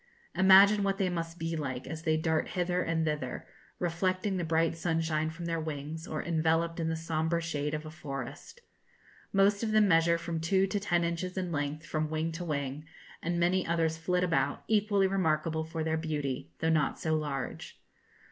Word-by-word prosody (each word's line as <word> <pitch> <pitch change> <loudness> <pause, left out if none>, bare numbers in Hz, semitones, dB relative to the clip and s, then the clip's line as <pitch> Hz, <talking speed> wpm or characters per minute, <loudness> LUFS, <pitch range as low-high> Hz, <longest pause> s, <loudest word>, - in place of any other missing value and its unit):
Imagine 195 +2 +7
what 195 -1 +1
they 190 -2 +1
must 165 -1 -4
be 165 0 -2
like, 130 -5 -4
as 160 0 -6
they 160 -1 +1
dart 160 0 0
hither 180 0 0
and 165 -2 0
thither, 150 -5 -3 0.3
reflecting 185 +3 0
the 175 - -1
bright 165 0 +1
sunshine 160 -2 0
from 165 +2 -7
their 165 -1 -1
wings, 155 +1 -5
or - - -3
enveloped 165 0 +1
in 160 -1 0
the 165 - 0
sombre 160 +1 -1
shade 150 -3 -2
of 155 +1 -5
a 155 - -7
forest. 140 - -7 0.7
Most 200 +1 +3
of 225 - -1
them 215 -1 +5
measure 170 -1 +4
from 170 -1 -4
two 190 +4 +2
to 205 +1 -1
ten 175 -4 +1
inches 170 +2 -2
in 180 -2 -2
length 150 +1 -2
from 155 -1 -2
wing 160 +1 -1
to 165 +2 -5
wing, 145 -2 -3 0.4
and 170 +1 -1
many 180 +2 +2
others 165 -1 +1
flit 180 +2 0
about, 170 -2 0
equally 205 -2 +3
remarkable 160 -4 +1
for 160 0 -4
their 160 0 0
beauty, 145 - -3
though 160 - +2
not 155 -2 +2
so 160 - -1
large. 150 -3 -3
165 Hz, 185 wpm, -30 LUFS, 155-180 Hz, 0.7 s, Imagine